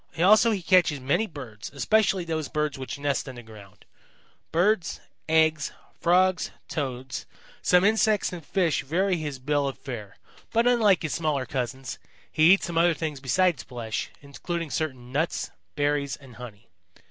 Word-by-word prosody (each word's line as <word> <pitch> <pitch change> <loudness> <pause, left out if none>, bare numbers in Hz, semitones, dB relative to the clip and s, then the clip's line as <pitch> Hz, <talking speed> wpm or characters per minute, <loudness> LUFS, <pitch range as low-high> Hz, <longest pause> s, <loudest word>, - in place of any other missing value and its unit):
Also 210 +7 +6
he 200 -5 -1
catches 175 -6 +4
many 140 +12 +1
birds, 120 - -9
especially 195 +3 +2
those 155 -4 -3
birds 150 -1 -1
which 135 +1 -6
nest 140 -1 -1
on 130 - -8
the 120 - -10
ground. 105 -2 -15 0.7
Birds, 180 +2 +1 0.3
eggs, 160 -1 +3 0.3
Frogs, 180 +1 +3 0.2
Toads, 130 -4 -4 0.3
some 180 0 +4
insects 215 -2 +2
and 170 -2 -7
fish 170 -1 +1
vary 180 +6 +1
his 150 -4 -4
bill 145 +2 0
of 135 - -4
fare. 110 -7 -8 0.3
But 230 +1 +2
unlike 220 -8 +4
his 155 - -2
smaller 150 -5 0
cousins, 130 -2 -4 0.3
he 155 +3 +5
eats 195 - +1
some 170 -2 -1
other 170 0 +4
things 155 -4 -4
besides 170 +4 +2
flesh, 115 -3 -5
including 165 +3 -5
certain 130 -6 -3
nuts, 155 +5 -1 0.2
berries 145 -1 0
and 130 -4 -15
honey. 115 -3 -10
150 Hz, 155 wpm, -26 LUFS, 130-180 Hz, 0.7 s, Also